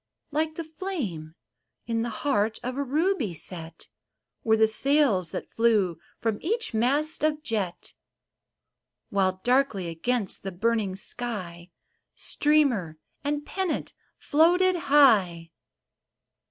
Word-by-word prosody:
Like 315 Hz, +1 st, -1 dB
the 335 Hz, -, -4 dB
flame 275 Hz, -, -5 dB, 0.5 s
in 230 Hz, -1 st, -1 dB
the 240 Hz, -, -2 dB, 0.2 s
heart 220 Hz, -6 st, +1 dB
of 250 Hz, +1 st, -3 dB
a 280 Hz, -, -1 dB
ruby 280 Hz, -, 0 dB
set 165 Hz, 0 st, -7 dB, 0.6 s
Were 220 Hz, -1 st, +3 dB
the 220 Hz, -, +5 dB
sails 220 Hz, -, +2 dB
that -, -, -6 dB
flew 210 Hz, -8 st, +2 dB, 0.2 s
from 225 Hz, -2 st, -2 dB
each 455 Hz, -, -1 dB
mast 280 Hz, +8 st, +1 dB
of 305 Hz, 0 st, +1 dB
jet; 205 Hz, -, -3 dB, 1.2 s
While 185 Hz, -2 st, +1 dB
darkly 245 Hz, -8 st, +1 dB
against 205 Hz, +6 st, -1 dB
the 195 Hz, -, -5 dB
burning 210 Hz, 0 st, 0 dB
sky 190 Hz, -5 st, -5 dB, 0.5 s
Streamer 260 Hz, -, +1 dB, 0.3 s
and 290 Hz, +1 st, -2 dB
pennant 380 Hz, -4 st, -3 dB, 0.2 s
floated 355 Hz, +5 st, +3 dB
high. 210 Hz, -, +3 dB
230 Hz, 115 wpm, -26 LUFS, 190-295 Hz, 1.2 s, the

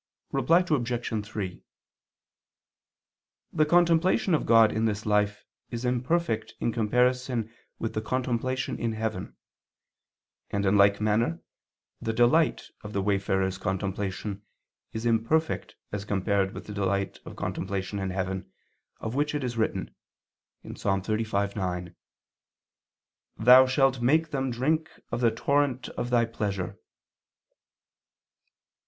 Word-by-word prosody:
Reply 175 Hz, +2 st, +3 dB
Obj. 120 Hz, -6 st, -1 dB
3: 95 Hz, -4 st, -5 dB, 1.9 s
The 155 Hz, -1 st, +3 dB
contemplation 175 Hz, +2 st, +3 dB
of 155 Hz, -, +1 dB
God 115 Hz, -2 st, +6 dB
in 110 Hz, +1 st, 0 dB
this 110 Hz, -1 st, -1 dB
life 105 Hz, -1 st, +1 dB, 0.2 s
is 120 Hz, +1 st, -4 dB
imperfect 125 Hz, 0 st, 0 dB
in 120 Hz, -, 0 dB
comparison 125 Hz, +1 st, +1 dB, 0.2 s
with 115 Hz, -, -3 dB
the 110 Hz, -, -1 dB
contemplation 130 Hz, +2 st, -2 dB
in 115 Hz, -1 st, -1 dB
heaven; 110 Hz, -3 st, -4 dB, 1.1 s
and 100 Hz, 0 st, -1 dB
in 95 Hz, +1 st, +3 dB
like 100 Hz, 0 st, +5 dB
manner 105 Hz, -5 st, +1 dB, 0.6 s
the 115 Hz, -, -1 dB
delight 120 Hz, +8 st, +3 dB, 0.2 s
of 105 Hz, -1 st, -8 dB
the 100 Hz, -, 0 dB
wayfarer's 95 Hz, -1 st, 0 dB
contemplation 95 Hz, +1 st, -3 dB, 0.5 s
is 110 Hz, +1 st, -5 dB
imperfect 120 Hz, +8 st, +1 dB, 0.2 s
as 105 Hz, -1 st, -3 dB
compared 100 Hz, -1 st, 0 dB
with -, -, -7 dB
the 105 Hz, -, -7 dB
delight 100 Hz, -1 st, -1 dB
of -, -, -10 dB
contemplation 100 Hz, +1 st, -3 dB
in 95 Hz, -1 st, -2 dB
heaven, 95 Hz, 0 st, -3 dB, 0.5 s
of 110 Hz, -, -3 dB
which 145 Hz, +2 st, 0 dB
it 145 Hz, -, -2 dB
is 120 Hz, -2 st, -3 dB
written 110 Hz, -1 st, -1 dB, 0.7 s
(Ps. -, -, -9 dB
35:9): 100 Hz, -3 st, -1 dB, 1.4 s
"Thou 125 Hz, +3 st, +8 dB
shalt 135 Hz, -1 st, +2 dB
make 155 Hz, +6 st, +3 dB
them 135 Hz, -2 st, -1 dB
drink 155 Hz, +7 st, 0 dB, 0.2 s
of 120 Hz, -, -2 dB
the 120 Hz, -, +5 dB
torrent 135 Hz, +2 st, 0 dB
of 120 Hz, -, -4 dB
Thy 120 Hz, -1 st, +3 dB
pleasure." 100 Hz, -5 st, -3 dB
115 Hz, 120 wpm, -27 LUFS, 100-130 Hz, 1.9 s, Thou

